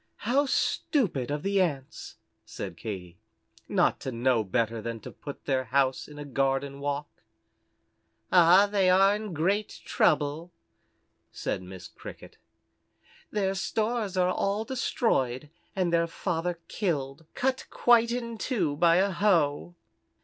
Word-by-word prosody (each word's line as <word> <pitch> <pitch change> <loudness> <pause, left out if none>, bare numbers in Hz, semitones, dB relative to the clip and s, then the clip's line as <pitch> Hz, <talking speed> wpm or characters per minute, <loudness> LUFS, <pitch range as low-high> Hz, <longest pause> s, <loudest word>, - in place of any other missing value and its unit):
"How 275 +5 +2
stupid 195 - 0
of 145 0 -3
the 195 0 +2
Ants," 140 -7 -3 0.3
said 95 -4 -7
Katy, 90 -3 -7 0.5
"not - - +2
to 130 - -5
know 120 -1 +1
better 115 +2 -1
than 115 0 -5
to - - -9
put 145 - -10
their 130 -2 0
house 130 +1 +1
in 150 - -12
a 145 - -6
garden 135 0 -1
walk." 145 +1 -4 1.1
"Ah, 180 +2 +7
they 200 -2 +2
are 195 +2 +5
in 210 -1 -5
great 190 +6 -1
trouble," 150 +4 +1 0.8
said - - -3
Miss 90 0 -10
Cricket. - - -12 0.9
"Their 195 -2 0
stores 215 0 -2
are 180 0 +2
all 200 +4 -1
destroyed, 150 - -1 0.2
and 180 -3 0
their 170 0 +3
father 175 0 -2
killed 155 -6 -3
cut 260 0 -1
quite 235 -1 +4
in 235 -2 -4
two 180 - -1
by 170 +1 +5
a 195 +2 +3
hoe." 175 -4 +1
170 Hz, 135 wpm, -28 LUFS, 135-200 Hz, 1.1 s, Ah